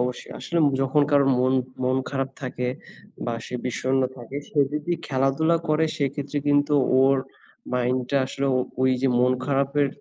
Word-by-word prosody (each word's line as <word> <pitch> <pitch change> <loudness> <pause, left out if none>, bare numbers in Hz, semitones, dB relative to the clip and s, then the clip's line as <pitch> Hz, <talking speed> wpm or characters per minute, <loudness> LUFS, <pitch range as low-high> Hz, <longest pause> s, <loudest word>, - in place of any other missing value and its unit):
অবশ্যই। 125 0 -3
আসলে 170 - -2 0.2
যখন 135 +2 +3
কারো 140 -1 +5
মন 130 +1 +2 0.3
মন 130 +1 +2
খারাপ 135 -1 -2
থাকে 125 -1 -3 0.6
বা 120 - -1
সে - - -7
বিষণ্ণ 130 +1 0
থাকে, 125 +2 -8
সে 150 - -4
যদি 150 +3 -2
খেলাধুলা 135 +5 +2
করে, 155 +1 +3
সেক্ষেত্রে 140 +1 -2
কিন্তু 145 +1 +3 0.3
ওর 135 +1 +4 0.6
মাইন্ডটা 125 +2 0
আসলেও 135 0 -1 0.3
ওই 130 - +4
যে 135 - +3
মন 125 +1 +4
খারাপের 140 +1 +1
135 Hz, 150 wpm, -24 LUFS, 130-145 Hz, 0.6 s, কারো